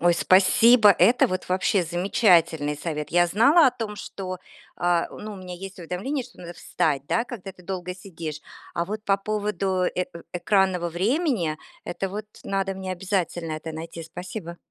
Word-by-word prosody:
Ой, 175 Hz, 0 st, +4 dB
спасибо, 210 Hz, +5 st, +6 dB
это 230 Hz, +6 st, +5 dB
вот 185 Hz, 0 st, -4 dB
вообще 185 Hz, +1 st, +2 dB
замечательный 170 Hz, -4 st, +2 dB
совет. 150 Hz, -1 st, -4 dB
Я 175 Hz, +1 st, +4 dB
знала 275 Hz, -, +5 dB
о -, -, +5 dB
том, 220 Hz, -4 st, -5 dB
что, 185 Hz, -3 st, -6 dB, 0.4 s
а, 175 Hz, -1 st, +1 dB
ну, 215 Hz, 0 st, -8 dB
у -, -, -8 dB
меня 180 Hz, -1 st, -8 dB
есть 195 Hz, +1 st, -9 dB
уведомление, 205 Hz, -, -3 dB
что 250 Hz, -, -18 dB
надо 175 Hz, 0 st, -8 dB
встать, 145 Hz, -4 st, -1 dB
да, 230 Hz, -, +1 dB
когда 195 Hz, -6 st, -8 dB
ты 180 Hz, -, -18 dB
долго 180 Hz, -1 st, -5 dB
сидишь. 165 Hz, -5 st, -7 dB, 0.3 s
А 170 Hz, -, 0 dB
вот 210 Hz, +3 st, -5 dB
по 195 Hz, 0 st, +3 dB
поводу, 195 Hz, -3 st, -1 dB
э, 180 Hz, 0 st, 0 dB
э, 170 Hz, -, -10 dB
экранного 180 Hz, -1 st, +1 dB
времени, 195 Hz, -, 0 dB, 0.3 s
это 195 Hz, +2 st, -3 dB
вот 210 Hz, +2 st, -6 dB, 0.2 s
надо 195 Hz, -1 st, -1 dB
мне 190 Hz, -1 st, -4 dB
обязательно 175 Hz, -3 st, -2 dB
это 155 Hz, +1 st, -5 dB
найти. 165 Hz, +1 st, -7 dB
Спасибо. 170 Hz, +1 st, -7 dB
185 Hz, 170 wpm, -25 LUFS, 170-205 Hz, 0.4 s, спасибо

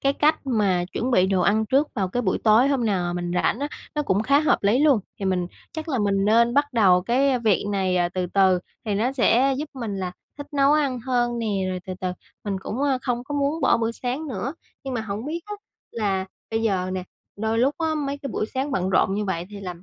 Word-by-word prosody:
cái 275 Hz, -, +2 dB
cách 295 Hz, 0 st, +1 dB
mà 200 Hz, -8 st, +1 dB
chuẩn 250 Hz, -, -1 dB
bị 185 Hz, -7 st, +4 dB
đồ 190 Hz, -1 st, +1 dB
ăn 215 Hz, +4 st, +2 dB
trước 275 Hz, +6 st, +2 dB
vào 195 Hz, -6 st, -1 dB
cái 245 Hz, +7 st, -2 dB
buổi 190 Hz, -5 st, 0 dB
tối 225 Hz, +5 st, +5 dB
hôm 270 Hz, -4 st, +1 dB
nào 195 Hz, -4 st, +1 dB
mà 175 Hz, -, -2 dB
mình 175 Hz, 0 st, -3 dB
rảnh 180 Hz, -, +1 dB
á, 290 Hz, -, -1 dB, 0.3 s
nó 300 Hz, -, 0 dB
cũng 200 Hz, -6 st, +1 dB
khá 280 Hz, +5 st, +4 dB
hợp 305 Hz, -, +3 dB
lý 205 Hz, +5 st, +3 dB
luôn. 285 Hz, -6 st, +4 dB, 0.2 s
Thì 200 Hz, -, -4 dB
mình 185 Hz, -2 st, 0 dB, 0.3 s
chắc 315 Hz, 0 st, -6 dB
là 270 Hz, -5 st, 0 dB
mình 200 Hz, -2 st, +1 dB
nên 235 Hz, +3 st, +4 dB
bắt 290 Hz, 0 st, +2 dB
đầu 190 Hz, -6 st, +4 dB
cái 255 Hz, +5 st, +2 dB
việc 220 Hz, -6 st, +2 dB
này 190 Hz, -2 st, +1 dB, 0.2 s
từ 185 Hz, -1 st, -1 dB
từ 190 Hz, 0 st, +3 dB, 0.3 s
thì 210 Hz, -3 st, -1 dB
nó 230 Hz, +6 st, +1 dB
sẽ 265 Hz, +1 st, +3 dB
giúp 300 Hz, +1 st, -4 dB
mình 230 Hz, -6 st, -4 dB
là 185 Hz, -2 st, -3 dB, 0.3 s
thích 285 Hz, -, -6 dB
nấu 280 Hz, 0 st, +4 dB
ăn 280 Hz, -5 st, +1 dB
hơn 240 Hz, -1 st, 0 dB
nè, 230 Hz, -, -2 dB, 0.2 s
rồi 185 Hz, 0 st, -3 dB
từ 185 Hz, -, -4 dB
từ 185 Hz, -1 st, -1 dB, 0.3 s
mình 200 Hz, -2 st, -2 dB
cũng, 215 Hz, -, -5 dB
ơ, 275 Hz, -2 st, +2 dB
không 245 Hz, -1 st, -2 dB
có 290 Hz, -, -5 dB
muốn 285 Hz, +3 st, 0 dB
bỏ 265 Hz, -, +4 dB
bữa 230 Hz, 0 st, 0 dB
sáng 255 Hz, +6 st, -4 dB
nữa. 255 Hz, -, -4 dB, 0.3 s
Nhưng 265 Hz, -1 st, -4 dB
mà 235 Hz, -, -1 dB
hổng 215 Hz, +1 st, -5 dB
biết 330 Hz, +3 st, -3 dB
á 420 Hz, -, -5 dB, 0.4 s
là 195 Hz, -4 st, -1 dB, 0.3 s
bây 225 Hz, 0 st, -1 dB
giờ 185 Hz, -4 st, 0 dB
nè, 185 Hz, -1 st, -3 dB, 0.3 s
đôi 220 Hz, +1 st, 0 dB
lúc 265 Hz, +5 st, +2 dB
á 320 Hz, -1 st, 0 dB
mấy 285 Hz, -2 st, -2 dB
cái 275 Hz, -2 st, -6 dB
buổi -, -, -1 dB
sáng 265 Hz, +2 st, -1 dB
bận 190 Hz, -7 st, 0 dB
rộn 190 Hz, 0 st, +3 dB
như 210 Hz, +1 st, -1 dB
vậy 180 Hz, -3 st, -3 dB
thì 205 Hz, -1 st, -8 dB
làm 180 Hz, -3 st, -7 dB
230 Hz, 250 wpm, -24 LUFS, 195-275 Hz, 0.4 s, tối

